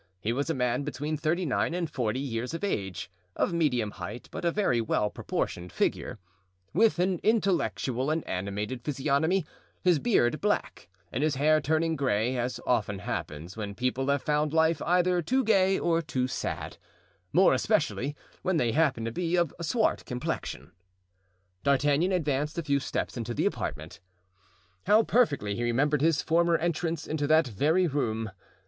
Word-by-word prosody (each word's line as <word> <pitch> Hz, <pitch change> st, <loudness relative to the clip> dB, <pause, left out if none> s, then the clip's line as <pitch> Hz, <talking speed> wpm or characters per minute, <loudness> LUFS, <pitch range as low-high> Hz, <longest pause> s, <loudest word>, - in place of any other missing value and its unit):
He 105 Hz, +6 st, -1 dB
was 140 Hz, +5 st, -2 dB
a 165 Hz, -, 0 dB
man 125 Hz, 0 st, 0 dB
between 150 Hz, +1 st, -3 dB
thirty 160 Hz, +4 st, 0 dB
nine 160 Hz, +3 st, 0 dB
and 175 Hz, -2 st, -1 dB
forty 125 Hz, -6 st, -2 dB
years 125 Hz, +1 st, -3 dB
of 165 Hz, -, -6 dB
age, 95 Hz, -, -3 dB, 0.2 s
of -, -, 0 dB
medium 125 Hz, -10 st, +1 dB
height 100 Hz, +5 st, -8 dB
but -, -, -6 dB
a 170 Hz, -, +3 dB
very 165 Hz, -, +1 dB
well 105 Hz, -2 st, 0 dB
proportioned 90 Hz, 0 st, -3 dB
figure; -, -, -1 dB, 0.6 s
with 215 Hz, +5 st, +4 dB
an 180 Hz, 0 st, +1 dB
intellectual 175 Hz, -, +1 dB
and 160 Hz, +1 st, -1 dB
animated 105 Hz, +6 st, -3 dB
physiognomy; 150 Hz, +6 st, +1 dB, 0.4 s
his 175 Hz, -4 st, +4 dB
beard 155 Hz, -, +2 dB
black, 205 Hz, -, -1 dB, 0.2 s
and 130 Hz, -, -2 dB
his 155 Hz, -2 st, +1 dB
hair 155 Hz, +3 st, +3 dB
turning 160 Hz, +3 st, +1 dB
gray, 125 Hz, -3 st, 0 dB
as 120 Hz, 0 st, -2 dB
often 105 Hz, -5 st, +1 dB
happens 80 Hz, -1 st, -5 dB
when 105 Hz, -2 st, -5 dB
people 125 Hz, +3 st, -1 dB
have 140 Hz, -1 st, +1 dB
found 150 Hz, 0 st, +1 dB
life 160 Hz, -1 st, +3 dB
either 180 Hz, 0 st, +2 dB
too 260 Hz, +10 st, +1 dB
gay 195 Hz, -4 st, +3 dB
or 165 Hz, -1 st, +1 dB
too 135 Hz, -5 st, -1 dB
sad, -, -, -4 dB, 0.5 s
more -, -, +5 dB
especially 140 Hz, +4 st, 0 dB, 0.3 s
when 185 Hz, -2 st, +1 dB
they 120 Hz, -6 st, +2 dB
happen 135 Hz, -5 st, +1 dB
to 115 Hz, -, -2 dB
be 175 Hz, +6 st, -1 dB
of 170 Hz, -4 st, +1 dB
swart 215 Hz, +8 st, +1 dB
complexion. 125 Hz, 0 st, -4 dB, 0.9 s
D'Artagnan 145 Hz, +5 st, +2 dB
advanced 150 Hz, -3 st, 0 dB
a 170 Hz, -, -1 dB
few 140 Hz, -2 st, +1 dB
steps 135 Hz, -, -3 dB
into 120 Hz, 0 st, -4 dB
the -, -, 0 dB
apartment. 75 Hz, +2 st, -3 dB, 0.9 s
How 215 Hz, +3 st, +6 dB
perfectly 145 Hz, -, +2 dB
he 120 Hz, -, -4 dB
remembered 135 Hz, +5 st, +1 dB
his 160 Hz, -1 st, +2 dB
former 170 Hz, +1 st, +3 dB
entrance 165 Hz, -1 st, -2 dB
into 150 Hz, -2 st, -2 dB
that 155 Hz, +1 st, +5 dB
very 155 Hz, -, +2 dB
room! 115 Hz, -, -1 dB
145 Hz, 165 wpm, -28 LUFS, 120-170 Hz, 0.9 s, How